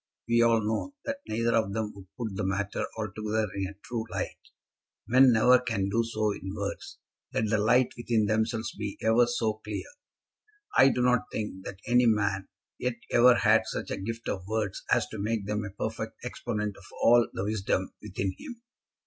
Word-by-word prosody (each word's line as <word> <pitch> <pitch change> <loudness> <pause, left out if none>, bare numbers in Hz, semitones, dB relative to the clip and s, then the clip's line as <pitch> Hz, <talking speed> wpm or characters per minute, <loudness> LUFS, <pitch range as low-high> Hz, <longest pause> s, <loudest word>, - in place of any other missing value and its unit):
We 115 0 +4
all 115 -1 +4
know 110 - -2
that 280 0 -3
neither 115 +2 0
of 110 -3 +1
them 110 -1 -2
would 95 -1 -13
put 110 -5 -4
the - - -2
matter 100 +1 -1
altogether 110 0 -1
in 95 -1 -2
a 100 - -10
true 115 -2 -3
light. - - -4 0.7
Men 130 +2 +6
never 125 +3 +6
can 100 -6 -1
do 115 +4 +2
so 110 -2 0
in 95 -1 -6
words, 100 -1 -5 0.3
let 110 -1 0
the 110 - +3
light 120 +4 +3
within 115 -2 +1
themselves 110 +1 0
be 105 -1 -5
ever 115 +2 +4
so 110 -3 -1
clear. 105 -1 -4 0.9
I 135 - +7
do 125 -1 0
not 125 -1 +3
think 95 -3 -5
that 95 0 -7
any 125 -1 +4
man 105 -3 +1 0.3
yet 125 -1 -1 0.2
ever 125 +1 +7
had - - +4
such - - -4
a - - -2
gift 115 +3 -5
of 95 -1 -3
words 110 -2 -2
as - - +4
to 110 - -7
make 105 0 -1
them 105 +1 -2
a 100 - -5
perfect 100 - -4
exponent 105 -3 -3
of 100 - -15 0.2
all 120 0 +6
the - - -3
wisdom 100 -3 -1
within 95 -2 -3
him. 240 -2 -9
110 Hz, 190 wpm, -28 LUFS, 100-115 Hz, 0.9 s, I